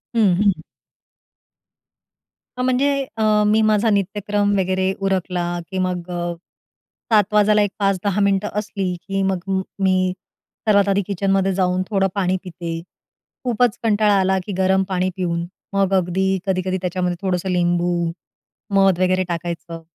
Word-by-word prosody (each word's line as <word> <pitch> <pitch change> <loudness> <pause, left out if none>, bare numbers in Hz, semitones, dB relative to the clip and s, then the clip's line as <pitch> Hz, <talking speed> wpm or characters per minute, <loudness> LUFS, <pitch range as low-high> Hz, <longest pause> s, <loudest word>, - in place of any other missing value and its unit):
हं, 200 -6 +4
हं. 200 -2 +4 2.0
हां 250 - -1
म्हणजे 255 +3 +2 0.3
अ, 220 - 0 0.2
मी 215 +1 +4
माझा 215 +1 +3
नित्यक्रम 205 +1 0
वगैरे 190 0 +1
उरकला 180 -2 -1 0.3
की 190 - -3
मग, 180 -1 -2 1.1
7 210 -2 +6
वाजायला, 210 0 +4
एक 205 -2 +1
5-10 195 0 0
मिनिटं 200 +1 +2
असली 195 -3 -3
की 195 0 -1
मग 190 - -1
मी, 190 -1 0 0.2
मी 185 -1 +2 0.5
सर्वात 200 -1 +4
आधी 200 +1 +2
किचन 195 0 -1
मध्ये 195 0 +2
जाऊन 185 0 +1
थोडं 195 -2 +2
पाणी 185 -1 +1
पिते. 170 -2 -5 0.6
खूपच 245 -1 +1
कंटाळा 210 -2 +3
आला 190 0 +2
की 205 - -5
गरम 190 0 +3
पाणी 185 0 0
पिऊन, 170 -2 -2 0.3
मग 195 -1 +1
अगदी 185 +1 +1 0.2
कधी-कधी 185 0 0
त्याच्यामध्ये 180 0 -1
थोडंसं 185 -1 -1
लिंबू, 175 -1 +1 0.9
मध 195 -2 +4
वगैरे 185 0 +2
टाकायचं. 170 -1 -5
190 Hz, 140 wpm, -21 LUFS, 180-205 Hz, 2.0 s, 7